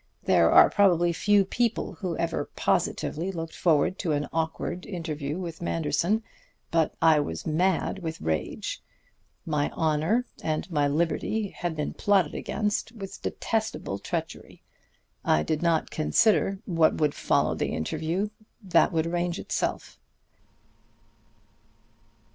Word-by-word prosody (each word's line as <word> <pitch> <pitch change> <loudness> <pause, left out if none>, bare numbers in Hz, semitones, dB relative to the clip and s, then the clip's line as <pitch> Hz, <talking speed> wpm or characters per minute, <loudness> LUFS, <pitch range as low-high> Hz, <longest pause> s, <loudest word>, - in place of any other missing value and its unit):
There - - +4
are - - +7
probably 175 -4 +4
few 200 +3 +3
people 235 +3 -1
who 180 -5 -4
ever 165 -3 -2
positively 175 +5 0
looked 165 -3 -6
forward 165 +2 +2
to 165 -5 0
an 145 0 -1
awkward 165 +2 -2
interview 155 -5 -4
with 170 -3 -6
Manderson; 170 +6 0 0.5
but 165 -2 +1
I 160 -2 +6
was 80 - -4
mad 180 +4 +1
with 160 -3 -5
rage. 80 -1 -3 0.6
My 150 -2 0
honor 160 +10 +1 0.2
and 155 +3 -2
my 145 -3 +2
liberty 170 +7 0
had 175 -3 -4
been 150 -1 -3
plotted 195 -7 +2
against 210 +1 -2
with 195 -4 -8
detestable 220 - -2
treachery. 165 - -5 0.6
I 75 - +3
did 155 - -1
not 170 -2 +1
consider 195 +4 +2
what 165 -4 +3
would 150 -2 +2
follow - - +1
the - - -1
interview. 165 - -2 0.3
That 190 -3 +3
would 160 -2 +1
arrange 175 +1 -1
itself. - - -3
165 Hz, 125 wpm, -27 LUFS, 155-190 Hz, 0.6 s, are